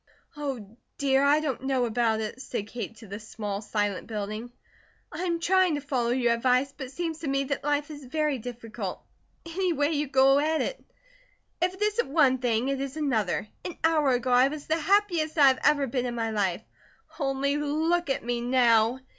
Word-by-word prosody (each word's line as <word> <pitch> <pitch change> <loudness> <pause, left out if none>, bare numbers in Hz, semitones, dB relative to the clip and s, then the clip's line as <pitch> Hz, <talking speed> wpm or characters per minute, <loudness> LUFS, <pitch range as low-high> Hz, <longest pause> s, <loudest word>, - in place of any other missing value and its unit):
"Oh, 255 -8 -5 0.2
dear, 270 -1 +2
I 285 +2 +5
don't 275 -5 -2
know 265 -2 +1
about 225 -1 +1
it," 220 +4 -5
said 225 -6 -4
Kate 230 +1 -6
to 225 0 -13
the 200 +2 -6
small, 210 -2 -5
silent 205 -2 -2
building. 215 +2 -5 0.6
"I 340 +4 -4
am 340 -2 0
trying 365 -1 +3
to 290 - -3
follow 255 -4 -1
your 240 -1 +2
advice, 255 +3 +2
but 265 -3 -6
it - - -13
seems 325 +1 -4
to 320 - -5
me 275 0 +1
that 275 +1 -3
life 290 +1 0
is 290 -2 -9
very 300 0 -1
difficult, 230 -1 -6 0.5
any 355 +2 -1
way 290 0 +1
you 295 -1 0
go 270 +1 +5
at 315 +2 +1
it. - - -3 0.8
If 365 +1 +1
it 385 - -17
isn't 425 -1 0
one 275 -4 +4
thing, 245 +1 0
it 275 -1 -1
is 275 +2 -5
another. 240 -8 0 0.2
An 355 - -6
hour 315 -3 +3
ago 250 +1 0
I 250 +2 +6
was 295 +1 -6
the 320 - +1
happiest 345 -3 +1
I 280 -2 +8
have 260 - +1
ever 285 -2 +4
been 250 0 -2
in 240 - -4
my 225 -1 -1
life; 200 -2 -1 0.6
only 280 0 0
look 315 +3 0
at 270 - -1
me 240 0 -1
now! 240 -1 +3
270 Hz, 200 wpm, -27 LUFS, 235-305 Hz, 0.8 s, I